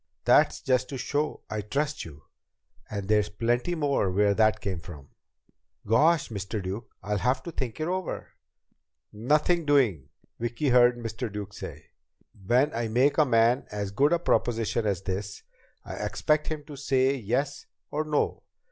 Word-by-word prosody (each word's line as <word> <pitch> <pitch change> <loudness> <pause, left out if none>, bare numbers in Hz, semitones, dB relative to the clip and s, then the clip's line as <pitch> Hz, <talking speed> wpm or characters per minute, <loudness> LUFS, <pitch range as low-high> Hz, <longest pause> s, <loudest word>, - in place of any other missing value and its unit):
That's - - +4
just 130 -1 +1
to 135 - -5
show 145 +4 -2
I 110 0 -3
trust 140 +8 -2
you. 75 -3 -12 0.7
And 100 -2 -4
there's 105 0 +2
plenty 120 +10 0
more 140 - +1
where 100 +2 +3
that 110 +1 +3
came 95 -3 -3
from!" 75 -5 -11 0.8
"Gosh, 155 +9 +3
Mr. 100 0 -4
Duke, 100 +4 -5
I'll 105 0 -1
have 130 +3 +1
to 170 - -6
think 130 -6 -4
it 155 - -1
over." 185 -1 -3 0.8
"Nothing 150 +10 +2
doing!" 130 - +2 0.3
Vicki 120 +5 -1
heard 120 -1 +5
Mr. 115 0 -5
Duke 100 -1 -6
say. - - -9 0.6
"When 130 +6 +3
I 115 0 -1
make 130 +7 +2
a 155 - +6
man 120 +1 +3
as 100 -2 -3
good 140 +9 +3
a 170 - +4
proposition 115 -8 0
as 95 -2 -1
this, 100 +2 -4 0.4
I - - -7
expect 150 0 0
him 155 -2 -4
to 145 -1 -10
say 135 -1 +2
yes 135 +4 -2 0.2
or 150 +1 -1
no. 150 -1 -1
120 Hz, 160 wpm, -27 LUFS, 105-145 Hz, 0.8 s, a